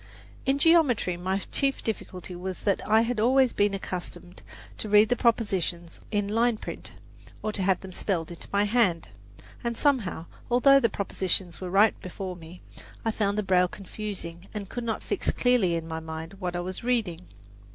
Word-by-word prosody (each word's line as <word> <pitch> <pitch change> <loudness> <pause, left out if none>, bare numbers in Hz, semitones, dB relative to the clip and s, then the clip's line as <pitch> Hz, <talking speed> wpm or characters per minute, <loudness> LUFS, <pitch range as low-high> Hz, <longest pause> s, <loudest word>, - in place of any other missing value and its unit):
In 270 +1 +3
geometry 285 - +4
my 185 +2 -1
chief 275 -1 0
difficulty 185 -4 -5
was 185 +1 -5
that 200 -2 +1
I 220 +1 +6
had 230 -1 -1
always 255 +2 +4
been 205 -1 +2
accustomed 180 -1 -6 0.4
to 215 - -4
read 210 +1 +6
the 245 - +3
propositions 190 -8 0
in 205 -2 0
line 230 +2 +2
print, - - -8 0.5
or 215 - 0
to 205 - 0
have 185 -1 +2
them 190 - -9
spelled 175 -3 -2
into 170 - -10
my 200 0 +3
hand; 205 -6 +2 0.5
and 235 -1 -2
somehow, 235 - +1 0.2
although 275 +3 +6
the 230 -4 +2
propositions 190 -3 -2
were 185 - -4
right 200 +4 +5
before 185 0 -6
me, 170 +1 -12 0.4
I 225 - +2
found 205 -1 0
the 210 - +1
braille 180 -1 +3
confusing, 195 -3 -7
and 200 -2 -5
could 245 - -4
not 225 -2 -2
fix - - -1
clearly 240 -9 +2
in 165 -1 -3
my 160 0 -4
mind 160 +3 -7
what 180 -2 -3
I 175 - -1
was 185 +3 -4
reading. 205 -8 -1
200 Hz, 180 wpm, -27 LUFS, 180-230 Hz, 0.5 s, I